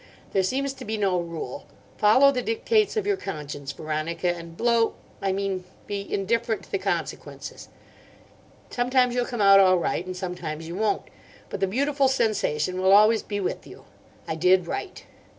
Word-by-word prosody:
There 195 - +3
seems 270 +8 -1
to 265 -1 -10
be 220 -1 -3
no 195 -3 +1
rule. 165 -6 -6 0.3
Follow 255 +7 +6
the 250 -2 -1
dictates 425 - +1
of 425 - 0
your 405 -1 +1
conscience, 145 - -6
Veronica, 155 +4 -2
and 165 -1 -10
blow—I 230 -4 0
mean 195 -1 -2 0.2
be 200 -1 -5
indifferent 225 +3 0
to - - -18
the 405 - 0
consequences. - - -4 1.0
Sometimes 250 0 +2
you'll 245 0 0
come 240 -3 -3
out 195 0 +8
all 185 -1 +6
right, 170 0 -1
and 185 0 -6
sometimes 175 -4 -5
you 170 - -6
won't. 210 +3 0 0.5
But - - -4
the 195 - +1
beautiful 275 +6 +1
sensation 185 - 0
will 190 +1 +5
always 215 +2 +6
be 205 -1 -4
with 190 - -3
you: - - -13 0.4
I - - -1
did 180 +2 +3
right. 370 - -5
200 Hz, 170 wpm, -25 LUFS, 180-240 Hz, 1.0 s, out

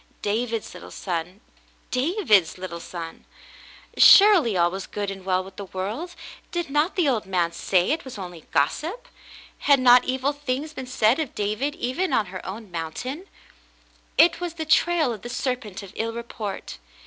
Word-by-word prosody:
David's 225 +1 -2
little - - -10
son 180 +2 -4 0.2
— - - -34
David's 255 - +2
little 180 -2 -6
son! 170 -1 -8 0.7
Surely 370 - +7
all 175 0 +3
was 190 0 -6
good 205 -1 -3
and 195 -1 -8
well 185 0 +1
with 190 0 -13
the 200 - -6
world! 210 - -5 0.3
Did 345 -5 -3
not 300 +5 +1
the 355 -6 +2
old 225 -7 0
man 175 -3 +1
say 180 +3 +1
it 320 - -1
was 260 -4 -9
only 180 -4 -9
gossip? 345 - -1 0.5
Had 280 -2 +4
not 250 -1 +6
evil 265 +2 0
things 285 +2 -3
been 260 -4 -7
said 245 +1 +2
of 305 -6 -3
David 215 +8 -1
even 320 +3 -2
on 220 - +3
her 185 - -6
own 205 +1 -8
mountain? 250 - -5 0.9
It 335 +1 +5
was 345 -2 -4
the 320 -1 -4
trail 315 -3 +3
of 215 - -9
the 240 - -7
serpent 245 -6 -3
of 195 - -11
ill 230 0 -2
report. 215 - -6
235 Hz, 170 wpm, -24 LUFS, 190-295 Hz, 0.9 s, Surely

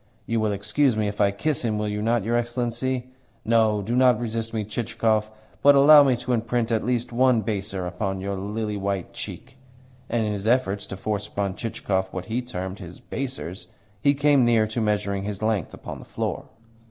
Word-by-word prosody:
You 115 0 0
will 110 -1 +1
excuse 110 +5 +1
me 105 -1 +1
if 105 +1 -3
I 100 - +5
kiss 140 +10 -1
him, 110 -3 0
will 105 0 -1
you 105 0 -2
not, 115 0 +1
your 115 +3 0
Excellency? 120 +1 -2 0.3
No, 110 -2 +3
do 115 +5 -2
not 125 -3 +5
resist 115 -1 -3
me, 110 -2 -2
Chichikov, 110 0 0 0.3
but 145 0 +7
allow 145 +2 +9
me 135 -3 +4
to 125 +1 -2
imprint 115 0 0
at 110 -1 +1
least 120 0 -1
one 125 -1 +4
baiser 100 -3 -3
upon 95 +2 -3
your 100 +1 -3
lily 105 +2 -3
white 100 -2 -3
cheek." 130 +1 -8 0.5
And 115 -2 +1
in 105 - -1
his 100 +1 -4
efforts 110 -5 +1
to 95 - -6
force 105 +1 -2
upon 100 -2 -2
Chichikov 95 -3 -2
what 90 -1 -5
he 115 +5 -2
termed 95 -6 -5
his 90 -3 -10
"baisers" 125 -9 -5 0.3
he 140 +4 +4
came 145 -2 +4
near 115 -2 +4
to 110 +2 -3
measuring 100 -2 0
his 105 0 -5
length 110 -6 0
upon - - -8
the - - -12
floor. - - -3
110 Hz, 200 wpm, -24 LUFS, 100-120 Hz, 0.5 s, allow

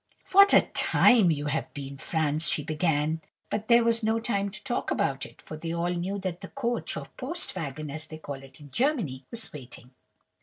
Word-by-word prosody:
"'What 400 +1 +8
a - - +8
time 220 -8 +4
you 150 -2 0
have 150 +2 -2
been, 140 -1 -6
Franz!' 155 0 +2
she 150 - +1
began; 155 0 0 0.3
but 215 +1 -2
there 235 -1 +6
was 230 0 +2
no 220 +1 +1
time 200 -3 -1
to 210 +1 -8
talk 240 - -2
about 135 0 -1
it, - - -20
for 155 - -9
they 165 +1 -5
all 170 +1 -1
knew 180 +3 -2
that 185 -3 -4
the - - -7
coach, 240 -3 -2
or - - -5
post 335 +7 0
wagon, 150 0 -5
as 155 +2 -4
they 155 - -8
call 140 -3 -7
it 135 +1 -14
in 145 -2 -13
Germany, 210 - -1
was 230 -1 -4
waiting. 125 -3 -11
165 Hz, 205 wpm, -27 LUFS, 145-225 Hz, 0.3 s, What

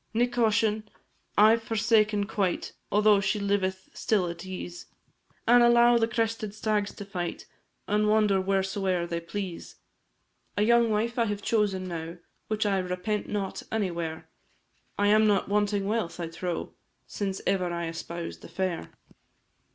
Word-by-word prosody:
Nic 245 +2 +2
Coisean 220 -2 +1 0.5
I 215 +2 +7
've 230 - -6
forsaken 215 -2 +2
quite, 200 -4 -1 0.2
Altho' 210 0 +5
she 200 +2 0
liveth 190 -2 -1
still 200 -5 +1
at 170 0 -7
ease 180 -2 -7 0.6
An' 240 +1 +7
allow 240 0 +6
the 225 - +2
crested 225 -2 -2
stags 210 -1 0
to 205 - -7
fight 175 -3 -4 0.4
And 210 +1 +2
wander 210 -2 +3
wheresoe'er 190 -2 0
they 170 -1 -3
please, 175 +1 -6 0.8
A 205 - +3
young 235 +1 +4
wife 230 +3 0
I 230 - +3
have 205 -2 -3
chosen 200 -4 0
now, 165 0 -5 0.3
Which 215 0 -1
I 195 -2 +2
repent 185 +3 -2
not 200 -2 -3
any 210 -4 0
where, 165 -2 -5 0.7
I 205 - +2
am 215 +1 +5
not 205 -1 +2
wanting 205 -1 +1
wealth, 210 -4 -2
I 170 -1 -3
trow, 170 +1 -4 0.3
Since 195 -2 -3
ever 185 -2 +1
I 170 -1 -2
espoused 170 +1 -6
the - - -11
fair. 185 - -3
205 Hz, 150 wpm, -27 LUFS, 185-215 Hz, 0.8 s, I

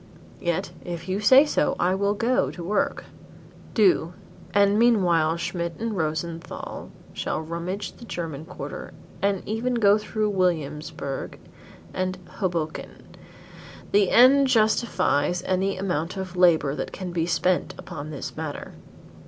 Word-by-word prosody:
Yet 175 +2 -1
if 175 -1 -6
you 190 +2 -1
say 260 +7 +7
so 295 - +1
I 180 +2 +2
will 200 +2 +1
go 235 +4 +1
to 175 - -8
work 200 +4 -1 0.3
" - - -21
"Do, 180 -6 +3 0.4
and 200 +1 +4
meanwhile 175 -9 +3
Schmidt 170 0 -3
and 225 -1 -3
Rosenthal 165 0 -4 0.2
shall - - -2
rummage 170 +5 -4
the 235 - -13
German 160 -7 -5
quarter 145 -5 -8 0.3
and 195 -1 0
even 235 +4 -1
go 210 -2 +5
through 215 0 -1
Williamsburgh 155 -6 -2 0.6
and 185 0 -2 0.2
Hoboken. 170 -5 -4 0.8
The 200 -2 +4
end 270 +3 +6
justifies 215 - +2
any 190 +1 0
amount 180 -1 -2
of 185 -1 -5
labor 165 -6 +4
that - - -4
can 185 -2 -6
be 170 -1 -1
spent 180 +1 +1
upon 145 0 -7
this 150 -3 -6
matter." 155 -2 -6
185 Hz, 135 wpm, -25 LUFS, 165-205 Hz, 0.8 s, say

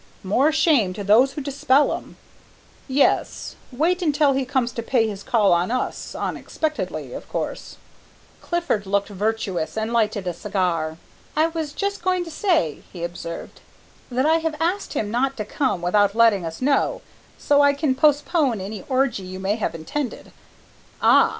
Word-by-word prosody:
"More 250 +11 +3
shame 295 - +3
to 205 - -5
those 235 +7 +5
who 290 - -5
dispel 280 0 +2
'em!" - - -8 0.7
"Yes, 275 +1 +1 0.2
wait 335 +8 +1
until 295 -3 +3
he 265 0 0
comes 255 -2 0
to 230 - -4
pay 230 -1 +1
his 200 -2 -5
call 210 -3 +3
on 175 +3 +1
us, 255 +2 -3
unexpectedly, 310 -1 -3
of - - -8
course - - -4 0.3
" - - -30
Clifford 345 - -1
looked 200 +1 0
virtuous 205 -4 -2
and 220 +2 -2
lighted 215 -4 +1
a 180 - -1
cigar. 170 -4 -1 0.4
"I 315 +2 +3
was 320 -3 -4
just 400 +5 -3
going 365 0 +1
to 330 - -8
say," 315 - +1
he 175 -2 -7
observed, 170 -1 -6 0.5
"that 255 +2 0
I 320 +1 +4
have 320 -1 -2
asked 360 +5 -1
him 210 -1 -2
not 265 +3 0
to 215 - -3
come 210 -7 -1
without 200 +3 +3
letting 220 -7 +4
us 165 +9 -6
know, 275 +1 +1 0.3
so 285 0 +3
I 285 0 +5
can 285 -2 +1
postpone 290 - +2
any 195 +1 -6
orgie 260 -5 +1
you 185 0 -7
may 195 +2 0
have 200 -6 -2
intended 245 - -5 0.3
" - - -29
"Ah!" - - +6
245 Hz, 170 wpm, -23 LUFS, 200-295 Hz, 0.7 s, Ah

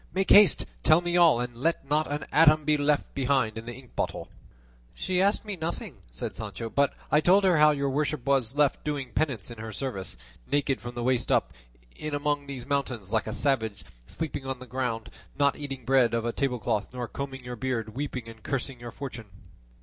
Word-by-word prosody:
Make 190 0 +1
haste; 205 -6 +7 0.2
tell 155 +1 +6
me 175 0 -1
all, 170 -8 +6
and 120 0 -3
let 140 +2 -1
not 150 +1 +1
an 145 0 -2
atom 155 -1 +6
be 150 0 +4
left 145 0 +1
behind 130 -5 +1
in 115 +1 -7
the 120 - -5
ink 130 -2 -15
bottle." - - -3 0.7
"She 185 -1 0
asked 200 +3 +2
me 205 -2 -4
nothing," 165 -1 -5
said - - -6
Sancho; 115 -1 -6
"but 140 0 +2 0.2
I 150 - +5
told 190 +5 +5
her 180 -5 +4
how 150 0 +8
your 140 -2 0
worship 150 -1 -1
was 135 -3 +1
left 145 -2 +2
doing 140 -4 -3
penance 130 - -1
in 115 - -9
her 110 0 -6
service, 100 - -4 0.3
naked 140 -2 +1
from 120 0 -7
the 120 - -3
waist 125 -1 +1
up, - - +2 0.4
in 150 -1 -4
among 145 0 -1
these 135 -3 -6
mountains 130 -8 -2
like 110 -1 +1
a - - -2
savage, 115 -6 -1 0.2
sleeping 145 -4 -4
on 135 -1 -2
the 130 - -10
ground, 120 -2 -3 0.3
not 140 0 +3
eating 135 -4 -6
bread 125 -2 +4
off 115 0 -1
a 120 - 0
tablecloth 120 -6 -1
nor 125 -1 -3
combing 135 -1 -6
your 125 0 -5
beard, 115 -3 -3
weeping 130 -3 -4
and 115 -1 -11
cursing 135 +1 -3
your 120 0 -7
fortune." 120 -5 -7
135 Hz, 205 wpm, -27 LUFS, 120-150 Hz, 0.7 s, how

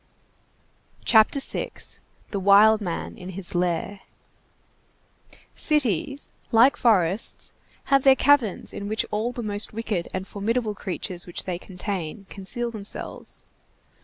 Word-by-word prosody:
CHAPTER 220 +4 +5
VI—THE 205 -5 -4
WILD 205 +3 +6
MAN 175 -4 -4
IN 180 - -8
HIS 190 -3 -1
LAIR 175 +2 -1 1.5
Cities, 275 - 0 0.2
like 235 +4 +6
forests, 195 -3 +1 0.3
have 275 -1 +3
their 270 0 +6
caverns 265 -8 +2
in 200 - -5
which 215 +1 -1
all 220 +3 -1
the 240 -1 -6
most 205 0 -2
wicked 210 -6 -3
and 185 +1 -4
formidable 220 +2 -1
creatures 185 -2 -4
which 175 - -2
they 180 -2 -4
contain 185 -1 -5
conceal 235 +5 -3
themselves. 210 -3 -3
205 Hz, 115 wpm, -25 LUFS, 185-235 Hz, 1.5 s, WILD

